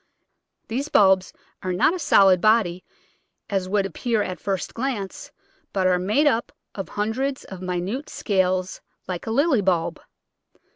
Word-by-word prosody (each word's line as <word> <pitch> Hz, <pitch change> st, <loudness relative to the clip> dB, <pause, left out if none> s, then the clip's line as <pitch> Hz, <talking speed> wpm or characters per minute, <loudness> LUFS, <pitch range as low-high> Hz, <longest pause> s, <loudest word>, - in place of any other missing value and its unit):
These 265 Hz, +6 st, -3 dB
bulbs 190 Hz, -5 st, +4 dB, 0.3 s
are 185 Hz, -, -2 dB
not 180 Hz, -, +3 dB
a 370 Hz, -, -4 dB
solid 195 Hz, -, +5 dB
body, 210 Hz, -5 st, +3 dB, 0.7 s
as 190 Hz, -2 st, -1 dB
would 200 Hz, 0 st, +1 dB
appear 215 Hz, +3 st, -1 dB
at 180 Hz, -1 st, -5 dB
first 195 Hz, -2 st, -3 dB
glance, 230 Hz, -6 st, -4 dB, 0.4 s
but 190 Hz, -2 st, 0 dB
are 180 Hz, -1 st, +3 dB
made 215 Hz, +12 st, +2 dB
up 240 Hz, -5 st, +1 dB, 0.2 s
of 195 Hz, -, -6 dB
hundreds 255 Hz, +6 st, -2 dB
of 190 Hz, -2 st, -10 dB
minute 185 Hz, +9 st, -3 dB
scales 185 Hz, -2 st, 0 dB, 0.3 s
like 180 Hz, +1 st, -5 dB
a -, -, -1 dB
lily 275 Hz, -1 st, +3 dB
bulb. 170 Hz, -3 st, 0 dB
195 Hz, 145 wpm, -23 LUFS, 185-230 Hz, 0.7 s, solid